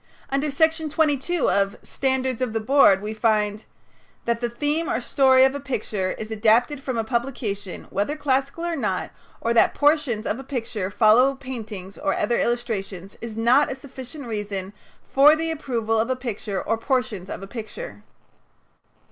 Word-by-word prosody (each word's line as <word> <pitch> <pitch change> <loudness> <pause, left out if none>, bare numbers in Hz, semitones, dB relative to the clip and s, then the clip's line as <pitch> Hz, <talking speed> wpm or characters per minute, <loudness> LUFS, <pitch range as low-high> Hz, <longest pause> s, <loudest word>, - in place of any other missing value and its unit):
Under 275 +2 0
Section 320 +2 +1
22 305 +2 +1
of 200 0 +1
"Standards 260 -2 -1
of 250 -4 -1
the 225 - 0
Board" 215 -5 +5
we 215 +1 -3
find: 215 -1 +1 0.6
"That 235 0 0
the 240 - 0
theme 295 +7 -1
or 225 - 0
story 260 +1 +5
of 265 - +2
a 285 - -4
picture 210 -8 -2
is 220 0 -7
adapted 230 +6 +2
from 260 -3 -3
a 225 - +1
publication, 220 -5 -3
whether 205 +10 -1
classical 280 +2 -1
or 340 -1 -1
not; 280 - -2 0.3
or 230 - +1
that 230 - +4
portions 290 -7 +2
of 230 - -1
a - - -7
picture 230 -7 -3
follow 235 +6 +5
paintings 220 -8 -8
or 195 - 0
other 235 +3 +1
illustrations, 200 -6 -2
is 225 -1 -6
not 250 +6 +4
a - - -3
sufficient 265 +1 -10
reason 205 -3 -4 0.3
for 290 +3 +6
the 325 +1 -2
approval 230 -7 -1
of 225 +3 0
a 260 - +1
picture 215 -6 -4
or 225 - -1
portions 240 -7 -1
of - - -6
a - - -7
picture." 240 - -7
240 Hz, 170 wpm, -24 LUFS, 215-275 Hz, 0.6 s, for